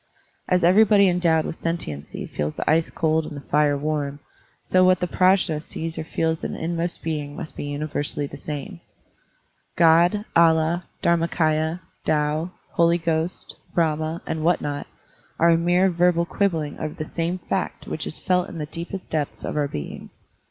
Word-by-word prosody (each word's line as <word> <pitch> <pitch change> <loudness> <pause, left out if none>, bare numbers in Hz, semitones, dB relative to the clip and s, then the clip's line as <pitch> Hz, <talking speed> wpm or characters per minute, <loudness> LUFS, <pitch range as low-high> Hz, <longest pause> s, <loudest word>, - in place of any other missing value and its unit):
As 180 -1 +2
everybody 200 +2 +6
endowed 170 -3 +2
with - - -5
sentiency 75 - -4
feels 75 +1 -3
the - - -4
ice 160 +1 +3
cold 160 0 +1
and 145 - -7
the 140 - -11
fire 145 -1 +3
warm, 145 -1 -2 0.4
so 185 0 +3
what 185 0 +5
the 180 - 0
PrajM 185 -4 +2
sees 165 +1 -5
or - - -4
feels 160 0 -1
in - - -3
its - - -6
inmost 170 +1 -2
being 150 -3 -3
must - - -7
be - - -5
universally 145 0 -2
the 140 - -8
same. 140 - -6 1.0
God, 170 +5 +4
Allah, 165 +1 +4 0.2
DharmaMya, 165 -1 +1 0.2
Tao, 150 +2 0 0.2
Holy 170 0 +3
Ghost, 165 0 -2 0.2
Brahma, 160 0 0
and 160 -1 -3
what 175 +2 +3
not, 145 -1 -4 0.5
are 170 +1 +5
a - - +6
mere 175 +3 +3
verbal 175 0 +3
quib 200 +3 +1
bling 155 -4 -4
over 155 -1 -4
the 155 - -4
same 170 +3 -2
fact 185 +1 -3
which 155 - -4
is - - -6
felt 180 -1 +1
in 170 - -8
the 150 - -3
deepest 170 +5 -7
depths 150 -2 -2
of - - -4
our 145 -1 +1
being. 75 - -7
165 Hz, 175 wpm, -23 LUFS, 150-175 Hz, 1.0 s, everybody